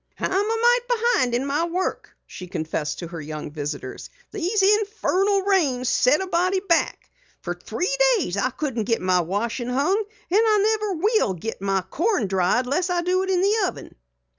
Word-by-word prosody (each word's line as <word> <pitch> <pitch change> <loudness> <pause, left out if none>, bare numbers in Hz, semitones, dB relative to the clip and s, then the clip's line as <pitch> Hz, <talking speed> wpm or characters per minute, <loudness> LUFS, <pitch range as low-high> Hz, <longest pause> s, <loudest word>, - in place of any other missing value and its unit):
"I'm - - -1
a - - -1
mite 460 +4 +2
behind 455 - +2
in 255 +3 -1
my 290 +4 0
work," 360 +2 -3
she 180 - -9
confessed 160 -3 -3
to 170 - -6
her 165 -2 -7
young 150 0 -6
visitors. 145 -3 -6 0.2
"These 395 +1 0
infernal 405 -1 +2
rains 285 -11 +1
set 275 +7 +3
a - - -2
body 365 +2 +1
back. 360 -4 0 0.3
Fer - - -2
three 375 +8 -3 0.2
days 240 - -2
I 200 +5 +1
couldn't 245 -5 -3
get 230 +1 +1
my 185 0 +2
washin' 225 +7 -3
hung, 280 +10 +1 0.3
an' 400 - +4
I 430 -2 +3 0.2
never 420 -2 -1
will 410 - +1
git 220 +4 -6
my 195 -1 0
corn 335 - 0
dried 190 +6 +1
less 340 +8 0
I 350 -1 0
do 365 +1 +1
it 380 - -3
in 365 -2 +2
the 410 +1 +2
oven." - - -8
335 Hz, 185 wpm, -23 LUFS, -, 0.3 s, an